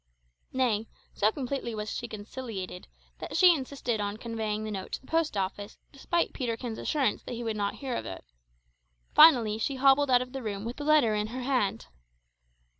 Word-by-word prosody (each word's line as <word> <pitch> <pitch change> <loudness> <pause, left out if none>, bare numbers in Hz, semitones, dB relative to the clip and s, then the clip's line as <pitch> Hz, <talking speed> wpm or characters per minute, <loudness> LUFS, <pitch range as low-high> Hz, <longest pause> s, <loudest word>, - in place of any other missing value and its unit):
Nay, 230 -4 +1 0.3
so 210 +1 +2
completely 255 -3 -3
was 210 0 -4
she 240 - -4
conciliated, 205 -4 -7 0.3
that - - -4
she 365 -2 +8
insisted 260 -6 -3
on 205 +1 -3
conveying 220 -2 -3
the 215 - -4
note 195 -2 -6
to - - -3
the - - -20
post 325 -8 0
office, 200 +2 -3
despite 335 +5 -1
Peterkin's 235 -2 -3
assurance 270 -8 0
that - - -7
he 240 - -5
would 225 -2 -2
not 205 -1 -1
hear 270 -3 -4
of - - -3
it. 95 -8 -8 0.9
Finally 235 -9 +7
she 270 +5 -1
hobbled 275 +1 +4
out 250 -1 +5
of 250 +1 -14
the 270 - -4
room 205 -2 -4
with 235 +2 -5
the 295 - -5
letter 295 -7 +4
in 210 0 0
her 250 +3 -5
hand. 245 - 0
235 Hz, 190 wpm, -29 LUFS, 210-270 Hz, 0.9 s, she